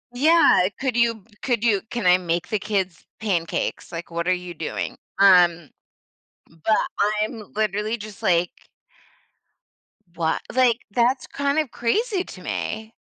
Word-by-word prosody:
Yeah, 315 - +5
"Could 265 -3 -1
you 230 -3 +1 0.2
could 240 -4 0
you 210 -5 +3
can 235 -5 -3
I 180 0 +6
make 170 -1 -2
the 215 - 0
kids 190 -4 -2 0.2
pancakes?" 180 -7 -2
Like, 170 +1 -7
"What 170 +1 -3
are 185 - +4
you 180 -1 -5
doing?" 160 -1 -4 0.2
Um 175 -5 +5 0.8
But 165 +7 0 0.4
I'm 215 -1 -5
literally 215 +1 -1
just 210 -2 -10
like 175 0 +3 1.7
What? 160 -1 0
Like, 250 -2 +2
that's 245 +5 +1
kind 280 +2 0
of 305 -4 -1
crazy 385 - 0
to 185 - -11
me. 220 +4 -4
210 Hz, 140 wpm, -23 LUFS, 180-235 Hz, 1.7 s, I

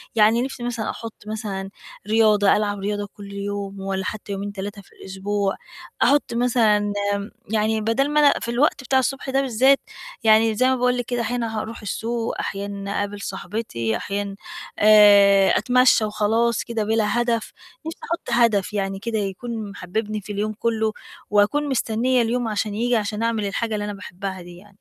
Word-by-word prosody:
يعني 220 +2 +4
نِفْسي 260 -2 -4
مثلًا 240 -2 -3
أحُط 230 -1 -6
مثلًا 200 -3 -4 0.4
رياضة، 215 -2 +4
ألعب 205 -1 -1
رياضة 205 +1 -3
كل 200 -1 -11
يوم 200 0 -5
والّا 190 0 -3
حتّى 210 -1 -5
يومين، 200 +1 -4
3 200 +1 -6
في - - -24
الأسبوع، 195 +1 -2 0.5
أحُط 285 -4 +3
مثلًا 220 -4 +2 0.2
آمم 200 +1 -6 0.2
يعني 220 0 +1
بَدَل 240 +6 +1
ما 300 0 +2
أنا 290 -1 +6
في 235 - -3
الوقت 260 +2 +1
بتاع 265 +1 +2
الصبح 270 +1 -2
ده 270 +1 +2
بالذات، 265 +2 +3 0.4
يعني 220 0 +5
زي 255 +3 +3
ما 260 - +3
باقول 250 0 +1
لِك 245 - -2
كده 245 -1 -2
أحيانًا 230 -2 -2
هاروح 225 +1 -6
السوق، 230 +2 -3
أحيانًا 200 0 -4
أقابل 205 0 -3
صاحبتي، 175 - -3
أحيانًا 200 0 -4 0.4
آآ 205 -2 +7
أتمشّى 245 +1 +4
وخلاص 220 +2 +1
كده 230 -2 -2
بِلا 220 +1 +1
هدف 235 -2 -1 0.3
نِفْسي 325 - -6
أحُط 335 -6 -4
هدف 210 -3 +1
يعني 195 -1 -2
كده 225 0 -3
يكون 210 +2 -4
محبّبني 210 +3 -4
في 205 - -9
اليوم 210 +1 -2
كُلّه 220 0 0 0.4
وأكون 245 +9 +2
مستنّية 245 0 +1
اليوم 235 +1 0
عشان 210 -1 -2
ييجي 240 +2 +1
عشان 215 +1 -1
أعمل 225 -3 0
الحاجة 220 +3 -2
اللي 205 -1 -2
أنا 205 - -4
باحبّها 190 -1 -7
دي 175 0 -12
يعني. 205 +3 -16
215 Hz, 170 wpm, -22 LUFS, 200-235 Hz, 0.5 s, آآ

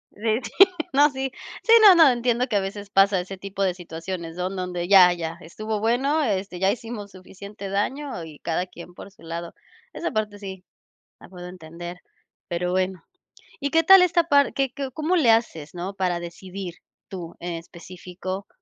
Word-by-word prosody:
Sí, 220 +2 0
sí, - - -7 0.4
no, 290 +2 +6
si. 265 -1 -4 0.3
Sí, 455 - +1
no, 405 -3 +10
no, 320 -4 +7
entiendo 245 0 +1
que 225 - -2
a - - +4
veces 200 +1 -6
pasa 195 -1 +4
ese 190 +2 -6
tipo 195 +1 -7
de 185 -2 +1
situaciones, 170 -1 -7
¿no? 180 +1 -1
Donde 180 -2 -4
ya, 185 -3 +8
ya 165 -1 -5
estuvo 215 +5 -5
bueno, 270 +8 +1
este, 195 -5 -2
ya 190 +1 +3
hicimos 220 -3 -7
suficiente 200 +2 -10
daño 210 - -2
y 155 -2 -11
cada 175 +2 -2
quien 175 0 -12
por 200 - -11
su 215 - -24
lado. 170 +1 -6 0.4
Esa 340 - -3
parte 210 -2 -3
sí, 190 -2 -8 0.6
la - - -14
puedo 180 -1 -10
entender. 175 0 -9 0.5
Pero 180 +1 -2
bueno. 185 -2 -1 0.6
Y 280 - -1
qué 325 +2 +3
tal 385 +3 +9
esta 345 -1 +3
par 285 -4 +3
¿que 270 -2 0
que 275 -2 -4
cómo 315 +6 0
le 255 -10 +5
haces?, 165 -10 0
¿no?, 180 +3 -5
¿para 180 -3 -1
decidir 180 +1 -8 0.3
tú, 175 -3 -8
en 175 0 -5
específico 180 +3 -8
195 Hz, 185 wpm, -24 LUFS, 180-235 Hz, 0.6 s, no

